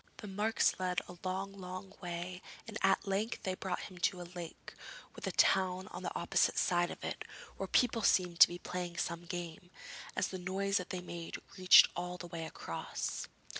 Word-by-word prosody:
The 210 - -8
marks 210 +3 +1
led 180 0 +1
a 180 -1 -11
long, 190 +1 -2
long 185 0 -7
way, 180 0 -5 0.3
and 220 - -7
at 195 - +3
length 205 +4 -1
they 185 - 0
brought 185 -1 -3
him 185 -3 -9
to 180 +1 +1
a 175 0 -9
lake, 175 -2 -8 0.4
with - - -6
a - - 0
town 185 0 +3
on - - -7
the - - -4
opposite - - +2
side 175 -1 +3
of - - -8
it, - - -3 0.3
where - - -3
people 240 -2 +3
seemed 180 -4 +3
to - - +12
be 175 - -6
playing 175 -1 -5
some 170 +1 -2
game, 175 0 -6 0.5
as - - +1
the 185 - -5
noise 195 +2 0
that 180 -3 -3
they 185 -2 -3
made 170 -2 -6 0.2
reached 185 0 +9
all 180 +1 -3
the 180 - -7
way 165 -2 -5
across. - - -4
180 Hz, 195 wpm, -34 LUFS, 175-190 Hz, 0.5 s, to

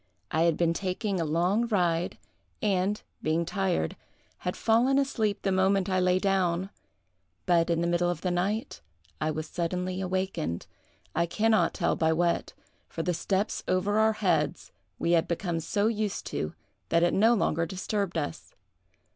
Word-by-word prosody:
I 160 - +1
had 165 -2 +2
been 170 -1 +2
taking 190 +2 -2
a - - 0
long 180 +9 +1
ride, 175 -5 +1 0.4
and, 200 0 +1 0.2
being 160 +2 +1
tired, 185 0 -1 0.4
had - - -3
fallen 240 +4 +3
asleep 220 -7 0
the 195 - +1
moment 190 0 +2
I 185 - +2
lay 180 0 +3
down; 190 -1 +1 0.7
but, 170 -2 +3
in 170 -1 +1
the 170 - +1
middle 175 0 +2
of 175 -2 -3
the 180 - 0
night, 185 - -1 0.4
I 155 - +1
was 155 0 -3
suddenly 180 +2 -2
awakened—I 180 - -3
can 220 +6 +1
not 220 - +3
tell 170 - +1
by 160 0 +2
what, 170 +1 0 0.4
for 165 - -4
the 180 - 0
steps 195 +4 -1
over 200 +3 +1
our 220 0 +4
heads 180 -6 0 0.3
we 170 - 0
had 170 -2 +3
become 170 -1 -1
so 205 +5 0
used 215 -2 -1
to 75 - -3 0.3
that 170 0 +3
it 175 - +3
no 225 +4 +5
longer 165 -5 +1
disturbed 195 +1 -2
us. 80 - -5
180 Hz, 165 wpm, -28 LUFS, 170-200 Hz, 0.7 s, no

